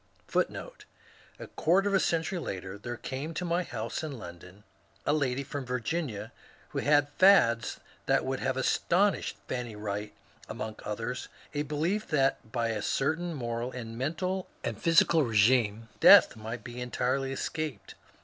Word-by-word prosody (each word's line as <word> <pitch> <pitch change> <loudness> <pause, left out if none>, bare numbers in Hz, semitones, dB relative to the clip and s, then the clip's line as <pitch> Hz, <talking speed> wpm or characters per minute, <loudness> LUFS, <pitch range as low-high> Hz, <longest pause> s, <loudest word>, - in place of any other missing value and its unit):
^ - - +2
^ - - -7 0.7
A - - -8
quarter 190 +5 +2
of 200 - 0
a 195 - +5
century 170 +2 0
later 95 - -5
there 120 +3 -5
came 145 +5 -5
to 180 - -2
my 175 +1 +1
boase 115 -6 -4
in 150 -4 -5
London 90 0 -11 0.4
a 145 - +3
lady 140 -3 0
from 140 0 -5
Virginia 125 -1 -3 0.4
who - - -3
had 145 -1 +3
fads 180 -12 +5 0.3
that - - +3
would - - -2
have - - -1
astounded - - +2 0.2
Fanny 120 -3 -4
Wright, 105 0 -4 0.4
among 110 -1 -5
others 115 +4 -4 0.3
a 145 - 0
belief 155 +8 -1
that 135 -6 +1
by 115 -2 0
a 110 -2 -2
certain 160 +9 0
moral 120 -1 -3
and 115 -3 -7
mental 180 +9 -2 0.2
and - - -4
physical 165 -1 +5
regimen 115 -1 +3
death - - +8
might 110 +2 -6
be 125 0 -7
entirely 130 +2 -1
escaped. 150 -3 -4
130 Hz, 155 wpm, -29 LUFS, 115-155 Hz, 0.7 s, death